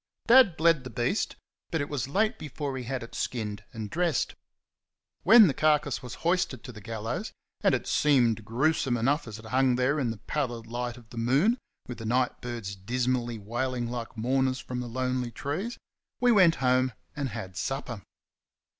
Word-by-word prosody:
Dad 235 -8 +6
bled 165 -4 +4
the 130 - -7
beast, 120 - -1 0.3
but 165 - -1
it 145 - -1
was 140 -5 -3
late 215 - +1
before 145 -2 -4
he 125 -2 -5
had 130 0 -3
it 115 - -11
skinned 105 -4 -3
and 110 -2 -5
dressed. 170 +8 0 0.9
When 225 -1 +9
the 155 - +2
carcase 150 -3 +2
was 125 -1 -7
hoisted 170 -8 +1
to 130 - -8
the 105 -3 -11
gallows 110 0 -4 0.3
and - - +4
it - - -4
seemed 120 -7 +3
gruesome 125 +2 +1
enough 135 +5 +1
as 110 -1 -7
it 110 - -12
hung 130 +2 +2
there 130 +4 +1
in 125 -4 0
the 115 - -4
pallid 120 -3 -3
light 120 +1 -4
of 115 -3 -16
the 120 - -10
moon, 145 - +3 0.3
with 125 - -7
the 115 - -6
night 125 +2 +1
birds 115 -5 -5
dismally 120 +3 -1
wailing 120 +3 -2
like 120 -1 -5
mourners 130 +3 +1
from 125 -1 -5
the 125 -1 -4
lonely 125 0 -1
trees 155 - -4 0.4
we 245 -1 +4
went 185 -7 +6
home 130 0 +3 0.2
and 140 -3 -2
had 105 -5 -7
supper. 120 +1 -3
125 Hz, 180 wpm, -28 LUFS, 115-145 Hz, 0.9 s, When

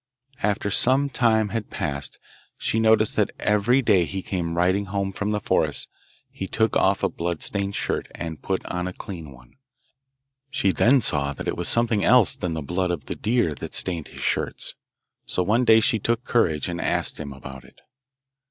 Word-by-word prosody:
After 105 0 0
some 135 +6 +3
time 110 -4 +2
had 115 -1 -4
passed 70 -1 -4 0.4
she 110 - 0
noticed 110 -1 +3
that - - +3
every 110 +6 +2
day 100 -6 +4
he 95 +2 -5
came 85 -3 -3
riding 95 +3 +2
home 95 0 -2
from 105 +2 -2
the 105 0 0
forest - - +1 0.4
he 95 - -5
took 110 +1 0
off - - +2
a - - +4
blood 85 -1 -4
stained 100 -1 -2
shirt - - -2
and 80 -2 -6
put 95 -1 -2
on 90 0 -3
a 90 - -5
clean 85 -7 -8
one. 60 -2 -18 0.9
She 100 -9 +1
then 130 +7 +4
saw 70 -7 0
that - - -7
it - - -1
was - - 0
something 115 -3 +2
else 125 -4 +5
than 85 -2 -3
the 80 - -4
blood 90 +5 -1
of 80 -6 -3
the - - -4
deer 110 -8 +1
that - - -7
stained 85 -5 -1
his - - -11
shirts, - - -1 0.5
so 90 - 0
one 115 +6 +2
day 110 -1 +7
she 110 0 +2
took 115 +3 0
courage 85 - +1
and 85 0 -3
asked - - 0
him 70 -2 -6
about 65 -1 -10
it. - - -20
100 Hz, 190 wpm, -24 LUFS, 85-110 Hz, 0.9 s, day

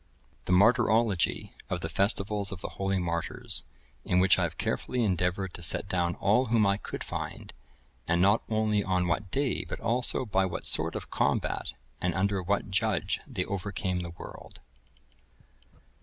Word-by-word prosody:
The - - -2
Martyrology 110 -1 +3 0.2
of 90 - -2
the 80 - -2
Festivals 100 +3 +1
of 95 -3 -7
the - - -4
Holy 95 0 -1
Martyrs, 85 -2 -1 0.4
in 90 - +2
which 95 0 +5
I - - +1
have - - -6
carefully 125 -1 -1
endeavoured 90 -1 0
to - - -8
set 85 - +1
down 90 -2 0
all 110 +6 +2
whom 110 -2 +3
I 100 0 +2
could - - -6
find, - - -6 0.5
and 85 +1 +2
not 100 +4 +4
only 110 -2 +1
on 90 -2 0
what 95 +3 -1
day, 135 +5 -1
but - - -6
also 125 +2 +2
by 95 -3 +1
what 85 - -5
sort - - +2
of - - -6
combat, - - 0 0.3
and 90 - 0
under 100 0 +1
what 95 +1 -1
judge 105 -1 0
they 110 -10 -3
overcame 95 -1 -3
the 85 -1 -5
world. 85 - -11
95 Hz, 165 wpm, -29 LUFS, 90-105 Hz, 0.5 s, which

